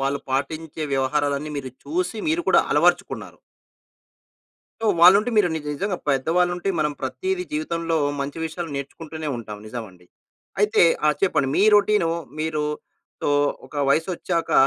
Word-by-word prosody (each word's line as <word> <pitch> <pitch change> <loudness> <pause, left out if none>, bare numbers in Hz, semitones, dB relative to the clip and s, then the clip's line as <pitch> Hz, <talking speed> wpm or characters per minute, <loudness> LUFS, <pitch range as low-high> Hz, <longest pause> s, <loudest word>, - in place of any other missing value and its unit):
వాళ్ళు 135 +1 -1
పాటించే 155 +4 -3
వ్యవహారాలన్నీ 140 +2 0
మీరు 130 -2 -5
చూసి, 350 -6 -2
మీరు 335 +2 +1
కూడా - - +6
అలవరచుకున్నారు. - - +1 1.4
సో 225 - -1
వాళ్ళుంటే 200 +7 +7
మీరు 205 -4 +5
నిజ 155 -2 -4
నిజంగా, 195 +3 -2
పెద్దవాళ్ళు 165 +6 +2
ఉంటే, 180 +2 -3
మనం 150 -1 +1
ప్రతీది 375 - -2
జీవితంలో, 170 - -1 0.2
మంచి 140 +3 -4
విషయాలు 165 +1 -5
నేర్చుకుంటూనే 155 +2 -6
ఉంటాం. 105 -3 -7
నిజం 115 +1 -5
అండి. 90 -1 -21 0.5
అయితే, 210 +1 +4 0.2
ఆ! - - +5
చెప్పండి. 155 -8 +2
మీ 200 - +4
రొటీను, 205 -4 +3 0.3
మీరు 155 -1 -1 0.6
సో, - - 0 0.4
ఒక - - -17
వయసొచ్చాక, 170 +3 0
160 Hz, 135 wpm, -23 LUFS, 140-195 Hz, 1.4 s, వాళ్ళుంటే